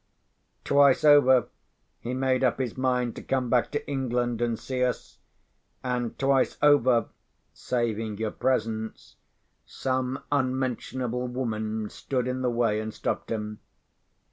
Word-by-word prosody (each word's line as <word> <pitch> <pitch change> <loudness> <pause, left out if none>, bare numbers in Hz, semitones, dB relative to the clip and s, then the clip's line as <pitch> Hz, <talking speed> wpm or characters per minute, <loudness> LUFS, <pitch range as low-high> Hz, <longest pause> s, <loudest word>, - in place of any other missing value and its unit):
Twice 140 0 +4
over, 140 -5 +6 0.5
he 125 +2 -4
made 130 0 +1
up 125 - +2
his 125 -4 -2
mind 125 -2 0
to - - -6
come 130 -3 -1
back 125 -2 +3
to 145 - -3
England 125 -4 -1
and 120 -1 0
see 130 +1 -2
us; 125 -1 -3 0.6
and 125 -2 -2
twice 135 -1 +2
over 130 -6 +4 0.4
(saving 115 -3 -2
your 110 0 -2
presence), 110 -3 -2 0.5
some 130 0 -2
unmentionable 130 -2 -1
woman 110 -3 -3
stood 125 -2 -2
in 125 0 -2
the 125 - +1
way 115 -3 +1
and 110 0 -4
stopped - - -3
him. 105 -1 -4
125 Hz, 130 wpm, -27 LUFS, 115-130 Hz, 0.6 s, over